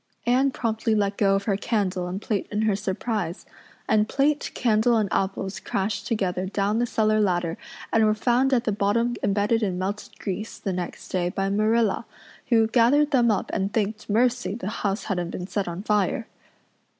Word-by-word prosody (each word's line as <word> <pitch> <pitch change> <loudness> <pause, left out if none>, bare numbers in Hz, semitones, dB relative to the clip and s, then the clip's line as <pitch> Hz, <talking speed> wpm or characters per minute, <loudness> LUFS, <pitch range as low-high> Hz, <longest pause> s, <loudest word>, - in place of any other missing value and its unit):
Anne 255 +3 +3
promptly 225 -3 -1
let 200 -1 +1
go 195 -1 +3
of 195 - -1
her 200 -1 +1
candle 195 -4 -1
and 185 +3 -5
plate 210 -4 -1
in 210 +1 0
her 215 -2 +2
surprise, 195 -2 -3 0.4
and 215 0 +2
plate, 290 +1 +1
candle, 230 0 +3
and 215 -2 +1
apples 195 0 -1
crashed 200 +1 -2
together 190 -4 -1
down 205 +3 0
the 240 - +1
cellar 215 -1 +2
ladder 175 -4 0 0.4
and 225 - +4
were 215 0 +3
found 245 +4 +2
at 245 -3 +3
the 220 - 0
bottom 215 +4 +1
embedded 205 +3 +1
in 190 -4 -1
melted 195 +3 -4
grease, 205 +3 -5
the 195 - -3
next 180 -1 -5
day, 175 -1 0
by 195 +2 -1
Marilla, 215 +1 +1 0.4
who 225 -2 +4
gathered 255 +6 +3
them 245 -4 +4
up 210 - 0
and 195 +1 -1
thanked 215 0 -2
mercy 245 0 +1
the 205 -4 -4
house 205 -1 -2
hadn't 175 -4 -2
been 180 - -5
set 200 0 -2
on 175 +3 -5
fire. 210 +1 +1
210 Hz, 185 wpm, -25 LUFS, 195-230 Hz, 0.4 s, and